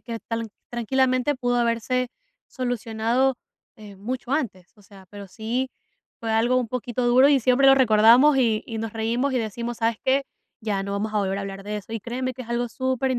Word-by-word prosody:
que 230 Hz, -2 st, -6 dB
tran 230 Hz, -1 st, -3 dB, 0.2 s
tranquilamente 255 Hz, +3 st, +1 dB
pudo 245 Hz, -1 st, 0 dB
haberse 240 Hz, +1 st, 0 dB, 0.4 s
solucionado, 245 Hz, +1 st, 0 dB, 0.4 s
eh, 210 Hz, -2 st, -12 dB
mucho 245 Hz, +5 st, -5 dB
antes, 210 Hz, -, -3 dB
o 205 Hz, -, -20 dB
sea, 195 Hz, -1 st, -16 dB
pero 200 Hz, -1 st, -10 dB
sí 235 Hz, +6 st, -3 dB, 0.5 s
fue 225 Hz, -1 st, -3 dB
algo 230 Hz, +3 st, +2 dB
un 250 Hz, -3 st, 0 dB
poquito 250 Hz, 0 st, -3 dB
duro, 255 Hz, +3 st, +6 dB
y 280 Hz, -3 st, +4 dB
siempre 255 Hz, +3 st, +3 dB
lo 270 Hz, -, +8 dB
recordamos, 245 Hz, +3 st, +6 dB
y 225 Hz, -4 st, +2 dB
y 225 Hz, -2 st, -5 dB
nos 220 Hz, -1 st, -4 dB
reímos 235 Hz, +5 st, -1 dB
y -, -, +2 dB
decimos: 235 Hz, +1 st, -4 dB
"¿Sabes 230 Hz, -1 st, 0 dB
qué? 270 Hz, +1 st, +2 dB, 0.4 s
Ya 205 Hz, -3 st, -2 dB
no 200 Hz, -, -4 dB
vamos 210 Hz, +2 st, -2 dB
a 210 Hz, -, +1 dB
volver 195 Hz, -1 st, -1 dB
a -, -, -3 dB
hablar 195 Hz, 0 st, -7 dB
de 210 Hz, 0 st, -4 dB
eso", 210 Hz, +2 st, -8 dB
y 225 Hz, -, -3 dB
créeme 255 Hz, +3 st, -3 dB
que 255 Hz, -, -8 dB
es 235 Hz, -, -14 dB
algo 235 Hz, 0 st, -1 dB
super, 260 Hz, +1 st, -1 dB
235 Hz, 205 wpm, -24 LUFS, 220-255 Hz, 0.5 s, lo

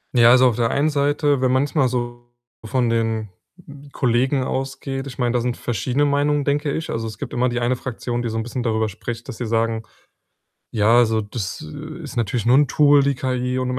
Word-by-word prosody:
Ja, 120 Hz, -1 st, +7 dB
also, 130 Hz, 0 st, +6 dB
auf 115 Hz, -, -3 dB
der 115 Hz, -1 st, +1 dB
einen 145 Hz, +3 st, +2 dB
Seite, 145 Hz, -1 st, +1 dB
wenn 130 Hz, -1 st, +2 dB
manchmal 140 Hz, +1 st, +2 dB
so 120 Hz, -1 st, -4 dB, 0.3 s
von 120 Hz, +1 st, 0 dB
den, 110 Hz, -2 st, -1 dB, 0.4 s
hm, 145 Hz, 0 st, -13 dB
Kollegen 130 Hz, +2 st, +1 dB
ausgeht 135 Hz, +1 st, -4 dB
ich 130 Hz, -, -9 dB
meine, 125 Hz, -2 st, +1 dB
da 125 Hz, -, +2 dB
sind 120 Hz, 0 st, -1 dB
verschiedene 125 Hz, +5 st, -1 dB
Meinungen, 145 Hz, +1 st, +1 dB
denke 145 Hz, +1 st, 0 dB
ich. 160 Hz, -, -4 dB
Also, 115 Hz, 0 st, -3 dB
es 110 Hz, -1 st, -8 dB
gibt -, -, -6 dB
immer 125 Hz, +1 st, +1 dB
die 120 Hz, 0 st, -2 dB
eine 120 Hz, +1 st, +1 dB
Fraktion, 120 Hz, -1 st, -4 dB
die 120 Hz, -, -2 dB
so 110 Hz, -, -3 dB
'n 110 Hz, -, -1 dB
bisschen 120 Hz, +2 st, -4 dB
darüber 110 Hz, -2 st, 0 dB
spricht, 115 Hz, +3 st, -7 dB
dass -, -, -7 dB
sie 125 Hz, -, -4 dB
sagen: 115 Hz, 0 st, 0 dB, 0.9 s
„Ja, 110 Hz, +2 st, +4 dB
also, 110 Hz, -2 st, +3 dB
das, 105 Hz, -4 st, -5 dB
äh, 155 Hz, +3 st, -8 dB
ist 140 Hz, -4 st, -8 dB
natürlich 115 Hz, 0 st, -1 dB
nur 120 Hz, +2 st, +5 dB
'n 145 Hz, -, +4 dB
Tool 145 Hz, 0 st, +4 dB
die 140 Hz, 0 st, +2 dB
KI 125 Hz, 0 st, -2 dB
und 125 Hz, -, -1 dB
im 125 Hz, -, -2 dB
125 Hz, 220 wpm, -21 LUFS, 115-140 Hz, 0.9 s, Ja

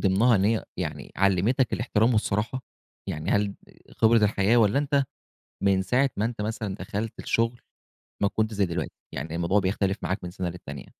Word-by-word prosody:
ضمنها 105 Hz, +5 st, +4 dB
إن 95 Hz, -, +2 dB
هي 110 Hz, +1 st, +2 dB
يعني -, -, -5 dB
علِّمتك 100 Hz, +6 st, +2 dB
الاحترام 115 Hz, 0 st, +2 dB
والصراحة؟ 110 Hz, +4 st, 0 dB, 0.4 s
يعني 75 Hz, +5 st, -3 dB
هل 100 Hz, -1 st, +1 dB, 0.4 s
خبرة 110 Hz, -1 st, +4 dB
الحياة، 105 Hz, +3 st, +3 dB
والّا 110 Hz, +2 st, +4 dB
أنت 140 Hz, -1 st, +2 dB, 0.6 s
من 95 Hz, -1 st, +3 dB
ساعة 125 Hz, +8 st, +2 dB
ما 105 Hz, -, +1 dB
أنت 115 Hz, -2 st, -3 dB
مثلًا 105 Hz, -2 st, -3 dB
دخلت 105 Hz, +3 st, -4 dB
الشغل 115 Hz, +1 st, 0 dB, 0.6 s
ما 100 Hz, -, +4 dB
كنتش 110 Hz, +1 st, -1 dB
زي 100 Hz, -2 st, +2 dB
دلوقتي، 85 Hz, +1 st, -3 dB, 0.2 s
يعني 80 Hz, +1 st, -5 dB
الموضوع 85 Hz, +4 st, +2 dB
بيختلف 95 Hz, +1 st, 0 dB
معاك 95 Hz, +3 st, -1 dB
من 90 Hz, -, -5 dB
سَنة 90 Hz, -1 st, -3 dB
للتانية؟ 90 Hz, +1 st, -8 dB
105 Hz, 170 wpm, -26 LUFS, 95-115 Hz, 0.6 s, ضمنها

